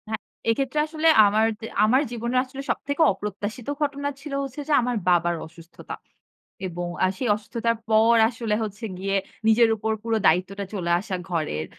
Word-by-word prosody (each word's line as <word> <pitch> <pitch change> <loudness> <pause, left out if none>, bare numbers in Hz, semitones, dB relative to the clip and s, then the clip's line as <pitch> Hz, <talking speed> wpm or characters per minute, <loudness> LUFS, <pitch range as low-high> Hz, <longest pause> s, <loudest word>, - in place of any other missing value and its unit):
হ্যাঁ, 220 -1 -2 0.3
এক্ষেত্রে 270 +5 0
আসলে 315 +1 0 0.2
আমার 215 +2 +3
দ - - -38 0.2
আমার 250 +6 +4
জীবনে 235 +1 -3
আসলে 265 +1 -8
সবথেকে 285 +3 -2
অপ্রত্যাশিত 205 +3 -5
ঘটনা 285 -1 -1
ছিল 290 -1 -7
হচ্ছে 275 +2 -7
যে, 305 - +1
আমার 245 0 -1
বাবার 175 -1 +3
অসুস্থতা 165 +1 -11 0.7
এবং 175 0 -5 0.2
আ - - +6
সেই 250 - -2
অসুস্থতার 230 +2 -2
পর 220 +2 +5
আসলে 230 -3 -2
হচ্ছে 215 +2 -6
গিয়ে 195 +1 -1 0.3
নিজের 225 +1 +5
উপর 220 +1 -2
পুরো 225 -1 0
দায়িত্বটা 190 +5 +1
চলে 180 -4 -3
আসা 190 0 -4
ঘরের 155 - -2
220 Hz, 165 wpm, -24 LUFS, 195-250 Hz, 0.7 s, আ